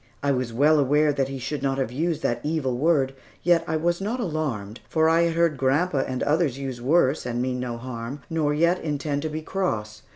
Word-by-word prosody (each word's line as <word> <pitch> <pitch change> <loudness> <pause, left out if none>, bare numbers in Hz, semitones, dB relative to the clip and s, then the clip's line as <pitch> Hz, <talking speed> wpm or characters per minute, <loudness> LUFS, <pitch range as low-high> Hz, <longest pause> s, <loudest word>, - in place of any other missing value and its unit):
I 140 - +2
was 125 -3 -1
well 150 +6 +4
aware 145 +2 +3
that 135 -2 0
he 135 0 -5
should 130 +3 -4
not 135 -1 0
have 130 -4 -1
used 160 +4 -1
that 120 0 0
evil 145 -4 -1
word, 135 -1 +2 0.3
yet 170 -1 +3 0.2
was 175 +1 +1
not 225 +6 -2
alarmed, 145 - -3
for 160 0 +3
I 165 +1 +4
had 165 -1 -1
heard 165 -3 +2
grandpa 140 +4 +1
and 130 -1 -2
others 150 -3 +1
use 135 -3 -5
worse, 140 +1 +3
and 120 -1 -3
mean 125 0 -1
no 120 -2 -3
harm, 125 +3 -6
nor 155 -3 0
yet 170 +4 +2
intend 145 -1 -2
to 155 - -2
be 155 +1 -5
cross. 110 - -2
145 Hz, 215 wpm, -25 LUFS, 130-160 Hz, 0.3 s, well